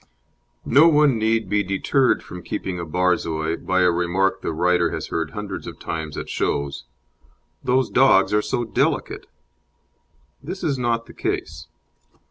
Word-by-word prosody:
No 145 Hz, +6 st, +6 dB
one 150 Hz, -6 st, +4 dB
need 110 Hz, -1 st, +1 dB
be 105 Hz, +2 st, +1 dB
deterred 100 Hz, +7 st, +1 dB
from 90 Hz, -, -9 dB
keeping 90 Hz, +1 st, -4 dB
a 85 Hz, -, -4 dB
Borzoi 85 Hz, -2 st, 0 dB
by 95 Hz, 0 st, 0 dB
a 90 Hz, -1 st, +4 dB
remark 90 Hz, +3 st, 0 dB
the -, -, -2 dB
writer 85 Hz, +1 st, +2 dB
has -, -, -5 dB
heard 80 Hz, -1 st, -2 dB
hundreds 100 Hz, +3 st, -6 dB
of -, -, -8 dB
times 80 Hz, -2 st, -5 dB
at -, -, -5 dB
shows: 70 Hz, -2 st, -2 dB, 0.8 s
"Those 130 Hz, +1 st, +2 dB
dogs 125 Hz, -7 st, +4 dB
are 105 Hz, -, +3 dB
so 120 Hz, -, -2 dB
delicate." 115 Hz, -, -1 dB, 1.1 s
This 180 Hz, +8 st, -7 dB
is 140 Hz, -4 st, 0 dB
not 115 Hz, -1 st, 0 dB
the -, -, -14 dB
case. 80 Hz, 0 st, -4 dB
95 Hz, 150 wpm, -22 LUFS, 85-120 Hz, 1.1 s, No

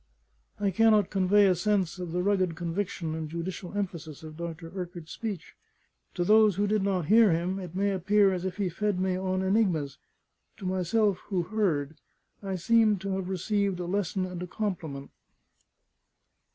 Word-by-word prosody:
I 200 Hz, -1 st, +1 dB
cannot 215 Hz, 0 st, +4 dB
convey 200 Hz, +1 st, +4 dB
a 190 Hz, -, +5 dB
sense 190 Hz, -1 st, 0 dB
of 180 Hz, -2 st, -5 dB
the 180 Hz, +1 st, -1 dB
rugged 185 Hz, -4 st, +1 dB
conviction 170 Hz, -1 st, -3 dB
and 160 Hz, -1 st, -4 dB
judicial 175 Hz, +4 st, -5 dB
emphasis 165 Hz, -7 st, -5 dB
of 155 Hz, -1 st, -9 dB
Dr. 165 Hz, 0 st, -6 dB
Urquart's 175 Hz, -3 st, -6 dB
speech. 205 Hz, -7 st, -5 dB, 0.6 s
To 175 Hz, -, 0 dB
those 215 Hz, +1 st, +5 dB
who 205 Hz, +2 st, +1 dB
did 210 Hz, 0 st, +1 dB
not 190 Hz, -4 st, 0 dB
hear 220 Hz, +2 st, +6 dB
him, 175 Hz, +4 st, -1 dB
it 180 Hz, -2 st, -8 dB
may 200 Hz, +1 st, +1 dB
appear 195 Hz, +1 st, +3 dB
as 180 Hz, -1 st, -3 dB
if 185 Hz, 0 st, -4 dB
he 200 Hz, -2 st, 0 dB
fed 200 Hz, +2 st, -1 dB
me 185 Hz, 0 st, 0 dB
on 185 Hz, 0 st, -1 dB
enigmas; 190 Hz, -, +1 dB, 0.6 s
to 195 Hz, -, -9 dB
myself, 185 Hz, +2 st, +1 dB
who 185 Hz, -4 st, 0 dB
heard, 170 Hz, -7 st, -1 dB, 0.4 s
I 195 Hz, -2 st, -3 dB
seemed 215 Hz, +2 st, +3 dB
to 195 Hz, 0 st, -3 dB
have 190 Hz, -1 st, -2 dB
received 195 Hz, 0 st, 0 dB
a 175 Hz, -, -3 dB
lesson 190 Hz, 0 st, -1 dB
and 180 Hz, -1 st, -6 dB
a 180 Hz, -, -4 dB
compliment. 165 Hz, -9 st, -4 dB
185 Hz, 170 wpm, -28 LUFS, 170-205 Hz, 0.6 s, hear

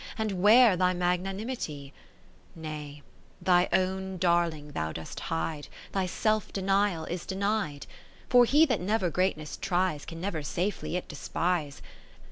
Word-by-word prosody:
And 210 Hz, -5 st, -2 dB
where 220 Hz, +1 st, +7 dB
thy 180 Hz, 0 st, +2 dB
magnanimity? 180 Hz, -, -2 dB, 0.6 s
Nay, 150 Hz, -2 st, -7 dB, 0.4 s
thy 180 Hz, -1 st, +3 dB
own 190 Hz, 0 st, 0 dB
darling 170 Hz, -4 st, +1 dB
thou 80 Hz, -, -2 dB
dost 80 Hz, 0 st, -7 dB
hide 160 Hz, -2 st, -3 dB, 0.2 s
Thy 190 Hz, -2 st, 0 dB
self 215 Hz, +4 st, 0 dB
denial 195 Hz, -3 st, +1 dB
is 175 Hz, 0 st, -4 dB
denied; 195 Hz, -6 st, -2 dB, 0.4 s
For 245 Hz, -1 st, +6 dB
he 295 Hz, +6 st, +5 dB
that 255 Hz, -, 0 dB
never 190 Hz, -2 st, 0 dB
greatness 170 Hz, -4 st, -1 dB
tries. 180 Hz, -5 st, 0 dB
Can 165 Hz, 0 st, -8 dB
never 175 Hz, -3 st, -3 dB
safely 175 Hz, +4 st, -2 dB
it 180 Hz, -, -3 dB
despise. 155 Hz, 0 st, -2 dB
180 Hz, 130 wpm, -28 LUFS, 160-195 Hz, 0.6 s, where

